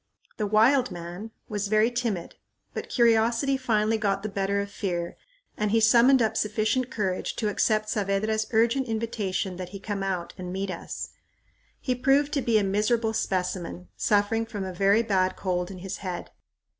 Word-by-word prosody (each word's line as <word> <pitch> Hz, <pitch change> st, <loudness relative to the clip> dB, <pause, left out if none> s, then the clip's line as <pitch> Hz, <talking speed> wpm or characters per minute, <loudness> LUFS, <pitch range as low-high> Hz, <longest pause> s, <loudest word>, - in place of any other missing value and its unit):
The 210 Hz, -, -1 dB
"wild 245 Hz, +5 st, +4 dB
man" 175 Hz, +4 st, -7 dB, 0.2 s
was 205 Hz, -1 st, -2 dB
very 215 Hz, +3 st, +3 dB
timid, 230 Hz, -8 st, -2 dB, 0.4 s
but -, -, -5 dB
curiosity 235 Hz, +3 st, +3 dB
finally 225 Hz, -4 st, +1 dB
got 195 Hz, -2 st, 0 dB
the 215 Hz, -, -2 dB
better 200 Hz, 0 st, -1 dB
of 200 Hz, 0 st, -4 dB
fear 175 Hz, -4 st, -3 dB, 0.4 s
and 210 Hz, 0 st, -1 dB
he 225 Hz, +2 st, +3 dB
summoned 240 Hz, +3 st, +6 dB
up 220 Hz, -, 0 dB
sufficient 215 Hz, +4 st, 0 dB
courage 190 Hz, -6 st, -2 dB
to 215 Hz, -, -1 dB
accept 215 Hz, +1 st, +1 dB
Saavedra's 215 Hz, +2 st, 0 dB
urgent 235 Hz, +4 st, +2 dB
invitation 210 Hz, -5 st, -2 dB
that 180 Hz, -1 st, -6 dB
he 200 Hz, +1 st, -8 dB
come 200 Hz, 0 st, -4 dB
out 185 Hz, -3 st, -3 dB
and 180 Hz, -1 st, -5 dB
meet 190 Hz, +1 st, -3 dB
us. 170 Hz, -, -6 dB, 0.7 s
He 255 Hz, -, -1 dB
proved 275 Hz, +3 st, +2 dB
to 280 Hz, -, +1 dB
be 230 Hz, -3 st, +2 dB
a 210 Hz, -, +2 dB
miserable 220 Hz, +3 st, +1 dB
specimen, 180 Hz, -, -2 dB
suffering 205 Hz, -, +1 dB
from 210 Hz, -3 st, -5 dB
a 190 Hz, -1 st, -5 dB
very 200 Hz, +5 st, +3 dB
bad 190 Hz, -4 st, +1 dB
cold 180 Hz, -2 st, -2 dB
in 195 Hz, -, -8 dB
his 185 Hz, +1 st, -5 dB
head. 180 Hz, -3 st, -6 dB
210 Hz, 170 wpm, -26 LUFS, 190-225 Hz, 0.7 s, summoned